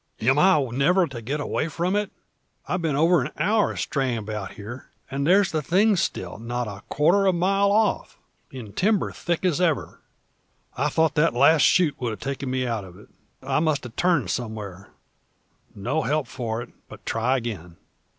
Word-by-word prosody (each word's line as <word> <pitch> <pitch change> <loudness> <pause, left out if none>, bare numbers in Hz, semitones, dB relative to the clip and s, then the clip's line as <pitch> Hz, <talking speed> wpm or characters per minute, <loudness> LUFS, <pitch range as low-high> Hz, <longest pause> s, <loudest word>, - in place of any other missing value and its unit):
"Am 130 +6 +3
I 185 -1 +5
never 175 +9 +3
to 130 -6 -8
get 135 +7 -3
away 150 +2 -1
from 170 +4 -1
it? 205 -1 -1 0.6
I've 180 0 -1
been 160 -4 0
over 165 +2 +4
an 130 - -3
hour 215 +1 +1
straying 130 -4 -1
about 105 -2 -5
here, 110 +5 -9 0.2
and 140 +1 -1
there's 195 +2 +4
the 155 - -1
thing 200 +8 +3
still 95 - -3
not 120 +1 -3
a 100 -1 -8
quarter 185 +7 +3
of 185 - +3
a - - -2
mile 195 +3 +2
off, 215 0 +1 0.3
and 115 -6 -9
timber 205 0 +1
thick 170 +1 -2
as 180 -1 +1
ever. 165 -5 -1 0.7
I 150 +3 0
thought 160 0 +2
that 150 -3 +2
last 145 +5 +5
shoot 155 -6 +3
would 120 - -1
have 110 - -6
taken 140 -1 -4
me 130 0 -1
out 115 -4 -2
of 90 -1 -13
it. 105 - -17 0.3
I 135 +1 0
must 155 -2 0
have 125 -3 -9
turned 150 - +1
somewhere. 105 -5 -5 0.9
No 140 +11 -1
help 150 -1 0
for 115 -1 -4
it, - - -14 0.2
but - - -13
try 125 +4 +1
again." 95 -9 -6
140 Hz, 190 wpm, -24 LUFS, 115-175 Hz, 0.9 s, I